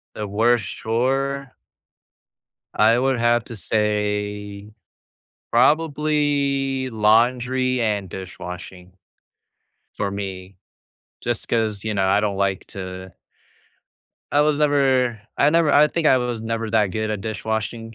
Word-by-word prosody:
The 105 -1 -4
worst 115 +3 +1
chore? 135 +4 -1 1.2
I 115 +3 +4
would 130 -1 +1
have 120 0 +2
to 115 - -8
say, 105 0 -2 0.8
probably 140 -1 +1
laundry 125 +3 +2
and 105 -4 -1
dishwashing, 90 0 -9 1.0
for 100 - -2
me, 95 -1 -6 0.6
just 120 -1 -2
'cause, 110 -3 -1
you 110 -1 -2
know, 95 -1 +1
I 100 +2 +3
don't 100 -2 -1
like 100 -1 -1
to 95 -1 -8 1.2
I 145 - +4
was 150 0 +2
never 135 -6 +2 0.2
I 145 - +4
never 165 -1 +3
I 150 +1 +6
think 160 0 -1
I 130 - +6
was 120 -2 -3
never 115 0 -3
that 110 -2 +2
good 110 +2 -2
at 105 - -3
dishwashing 110 +1 -4
115 Hz, 120 wpm, -22 LUFS, 105-130 Hz, 1.2 s, I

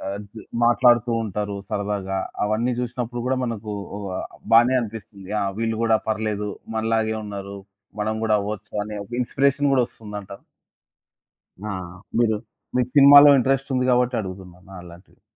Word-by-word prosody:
అద్ 105 0 -8 0.4
మాట్లాడుతూ 120 -1 +4
ఉంటారు 105 0 -3
సరదాగా, 100 -2 -2 0.3
అవన్నీ 110 +4 0
జూసినప్పుడు 120 -1 -4
గూడా 130 +1 +1
మనకు 110 -3 -5 0.2
ఒ - - -6 0.2
ఆహ్, - - -5 0.3
బానే 120 +3 +6
అనిపిస్తుంది. 105 -3 -9
ఆ! - - +1 0.2
వీళ్ళు 115 -1 -1
గూడా 115 -1 +4
పర్లేదు 105 -1 -2 0.3
మనలాగే 110 0 0
ఉన్నారు, 100 -1 -7 0.4
మనం 110 +1 -1
గూడా 110 -1 +3
అవ్వొచ్చు 105 0 -6
అని 105 0 -7
ఒక 115 - -22
ఇన్‌స్పిరేషన్ 140 +3 +1
గూడా 130 -2 +4
ఒస్తుంది 105 -3 -9
అంటా? 100 0 -10 1.3
ఆ! - - -2 0.5
మీరు 110 -2 +3 0.4
మీకు 125 -1 +1
సినిమాలో 145 +1 +9
ఇంట్రెస్ట్ 135 +2 0
ఉంది 125 0 +1
గాబట్టి 125 0 +2
అడుగుతున్నాను 95 -1 -10
అలాంటివి. 85 +1 -15
110 Hz, 140 wpm, -23 LUFS, 105-125 Hz, 1.3 s, సినిమాలో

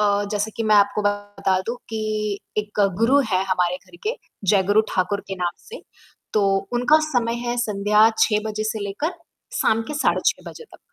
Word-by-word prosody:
अ, 205 -1 +2
जैसे 210 +1 -1
कि 230 - -1
मैं 215 -1 +3
आपको 205 +1 +3
बता 205 -2 0
दूँ 235 +2 -2
कि 220 -1 -4 0.6
एक 210 0 -2 0.2
गुरु 255 +5 +4
है 185 0 +2
हमारे 180 -1 +1
घर 345 - -18
के, 465 - 0 0.3
जय 195 -2 +4
गुरु 205 +3 +4
ठाकुर 195 +2 0
के 195 - -3
नाम 175 -2 -3
से। 480 - -9 0.5
तो 210 - +2 0.3
उनका 250 +6 +4
समय 245 -6 0
है 240 0 -1
संध्या 210 0 +3
6 210 -1 +3
बजे 215 0 -3
से 220 0 -2
लेकर 290 - -3 0.5
शाम 225 +1 +2
के 300 - -4
साढ़े 295 - +1
6 - - 0
बजे 470 - -11
तक। - - -18
210 Hz, 190 wpm, -22 LUFS, 200-235 Hz, 0.6 s, गुरु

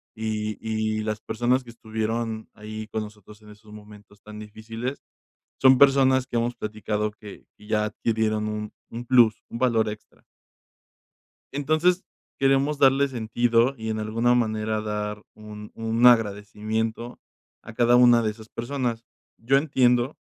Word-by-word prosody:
y 110 -1 -3
y 110 -1 -2
las 110 0 -3
personas 125 +2 0
que 120 - -12
estuvieron 110 0 -4
ahí 110 0 -8
con 110 - -3
nosotros 105 0 -13
en 105 - -16
esos 105 0 -16
momentos 105 -1 -15
tan 105 0 -11
difíciles, 115 +5 -7 0.6
son 130 -1 +7
personas 130 -2 +4
que 120 - -2
hemos 120 +1 -1
platicado 105 -1 -3
que 105 -1 -13
que 105 - -17
ya 105 -1 +1
adquirieron 110 0 -1
un 105 0 -4 0.2
un 120 +1 -7
plus, 120 -4 +4
un 115 - -6
valor 115 -4 +2
extra. 105 0 -11 1.3
Entonces, 155 +6 +1 0.3
queremos 135 +2 +2
darle 135 +1 +4
sentido 120 +1 +1
y, 110 0 -5
en 110 - -2
alguna 115 +3 +1
manera, 110 -2 0
dar 105 0 -4
un 105 0 -11
un 115 +2 +1
agradecimiento 110 +1 +1 0.4
a 115 - -11
cada 120 +1 +4
una 120 -1 +6
de 110 - 0
esas 110 +1 -12
personas. 120 -2 -3 0.3
Yo 130 +4 +2
entiendo 130 -2 +2
110 Hz, 145 wpm, -24 LUFS, 105-120 Hz, 1.3 s, son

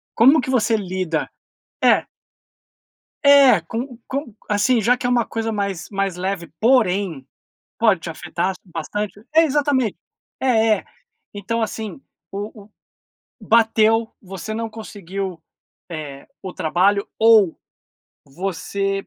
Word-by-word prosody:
como 265 +7 +6
que 260 - -4
você 235 -3 +2
lida 185 -5 -2 0.5
é. - - +4 1.2
É, 275 -9 +7
co 235 +8 -6
co 265 -5 -5
assim, 220 +4 +2
já 245 +4 +3
que - - -6
é - - +1
um 245 - +3
coisa 225 0 -3
mais 200 -4 -3
mais 195 -3 -2
leve, 180 -4 -3
porém, 200 - +2 0.5
pode 215 -6 +3
te 165 - -7
afetar 175 +3 -3
bastante 200 +4 -5
é, 325 - +6
exatamente. 280 - +1 0.4
É 225 -4 +3
é. - - -11 0.5
Então 225 +3 -3
assim, 220 +3 -4 0.3
o 205 +1 -6
o 210 - -21 0.8
bateu, 225 0 +3
você 195 +3 -6
não 225 0 -3
conseguiu, 195 -4 -6 0.5
eh, 145 -4 -7
o 185 - -7
trabalho, 185 +4 +1
ou 220 -6 +5 0.7
você 195 +5 -3
205 Hz, 125 wpm, -21 LUFS, 185-230 Hz, 1.2 s, É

